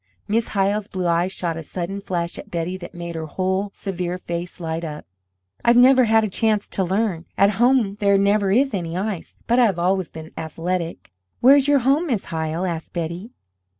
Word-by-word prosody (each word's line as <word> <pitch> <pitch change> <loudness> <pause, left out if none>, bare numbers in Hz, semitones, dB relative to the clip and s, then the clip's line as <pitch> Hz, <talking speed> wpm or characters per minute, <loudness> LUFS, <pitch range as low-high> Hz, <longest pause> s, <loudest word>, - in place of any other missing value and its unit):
Miss 225 +2 +1
Hyle's 200 +1 0
blue 185 -4 -4
eyes 170 +2 +1
shot 170 -3 -3
a - - -4
sudden 185 +5 -5
flash 175 -3 -3
at - - -10
Betty 170 +2 -2
that 185 -1 -9
made 170 0 -6
her 160 -1 -5
whole 190 +5 -1
severe 180 -2 -3
face 175 0 -5
light 165 0 -3
up. 150 -2 -6 0.6
"I've 235 0 +5
never 255 0 +7
had 220 0 +4
a - - +1
chance 210 +1 0
to 190 - -1
learn 185 -2 -1
at 200 +1 +5
home 240 -5 +3
there 200 -2 +4
never 200 0 +2
is 270 +6 +3
any 170 -3 -3
ice 200 -2 -4
but 240 +2 +3
I 245 - +6
have 195 -6 +1
always 185 0 +1
been 160 0 -10
athletic." 165 - -4 0.3
"Where 265 +3 +7
is 280 -1 +3
your 285 -2 +4
home, 290 +6 +3
Miss 235 -9 -1
Hyle?" 160 +2 -2
asked 165 -3 -4
Betty. 170 +5 -4
190 Hz, 200 wpm, -22 LUFS, 170-215 Hz, 0.6 s, never